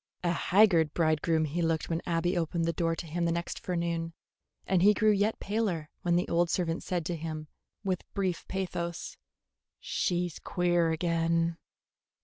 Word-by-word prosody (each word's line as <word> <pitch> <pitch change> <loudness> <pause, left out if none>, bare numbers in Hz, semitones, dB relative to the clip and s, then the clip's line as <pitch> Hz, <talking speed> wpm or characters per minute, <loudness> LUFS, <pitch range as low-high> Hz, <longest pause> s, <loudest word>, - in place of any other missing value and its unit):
A 175 - +2
haggard 175 -3 +4
bridegroom 160 0 +2
he 160 +4 -2
looked 165 -1 0
when 165 0 -1
Abby 175 +2 +1
opened 165 0 0
the 165 - 0
door 165 -1 0
to 170 - -6
him 170 +2 -2
the 170 - +2
next 170 +1 -3
forenoon, 170 -2 -2 0.5
and 185 -2 +2
he 205 +3 +6
grew 215 +2 +4
yet 210 +2 +1
paler 195 -7 -1
when 175 -1 +2
the 175 - +1
old 170 0 +2
servant 165 -3 0
said 175 -3 -2
to 175 - -2
him, 155 -1 -5 0.4
with 185 -3 -3
brief 190 -4 -1
pathos, 175 -3 -3 0.6
"She 180 -1 0
's 170 - -9
queer 175 -2 +1
again." 165 0 +1
170 Hz, 165 wpm, -30 LUFS, 165-180 Hz, 0.6 s, he